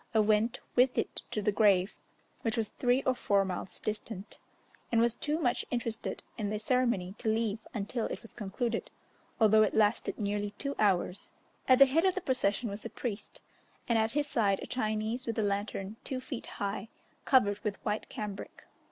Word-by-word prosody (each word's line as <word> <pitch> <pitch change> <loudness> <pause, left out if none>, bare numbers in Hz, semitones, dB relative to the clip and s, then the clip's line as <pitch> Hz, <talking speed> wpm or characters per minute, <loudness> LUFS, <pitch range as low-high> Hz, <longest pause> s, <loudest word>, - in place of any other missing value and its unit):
I - - +6
went 215 +3 +3 0.2
with 250 +1 +4
it - - -1
to 210 - -2
the 210 - +3
grave, 200 -2 +3 0.5
which 225 +1 -1
was 220 -2 0
three 250 +1 +1
or 260 - +3
four 200 -5 +2
miles 185 0 -5
distant, 215 -1 -5 0.5
and 230 - +4
was 235 0 +4
too 300 +5 -1
much 245 -6 +1
interested 230 -2 -3 0.2
in 205 -2 -1
the 210 - -1
ceremony 220 -5 +1
to 220 - 0
leave 220 -1 -1
until 220 +2 -2
it - - -6
was 230 - -13
concluded, 225 +3 -2 0.5
although 220 -1 +6
it 215 - +2
lasted 215 +1 +2
nearly 205 -1 -2
two 280 0 -2
hours. 195 -2 +1 0.4
At 255 - +7
the 275 - +10
head 295 +5 +2
of 375 - +3
the 380 - -1
procession 245 - +1
was 200 0 -5
a 230 - -5
priest, 225 -4 -5 0.5
and 235 -2 +3
at 220 +1 +1
his 295 0 +1
side 205 -8 +1
a - - -4
Chinese 220 +1 -2
with 230 - -2
a 220 - +2
lantern 200 0 -2
two 260 - -3
feet 255 -1 -6
high, 200 +2 -3 0.3
covered 205 -6 +4
with 210 -3 -3
white 210 0 -1
cambric. 205 -2 -6
220 Hz, 185 wpm, -31 LUFS, 205-245 Hz, 0.5 s, the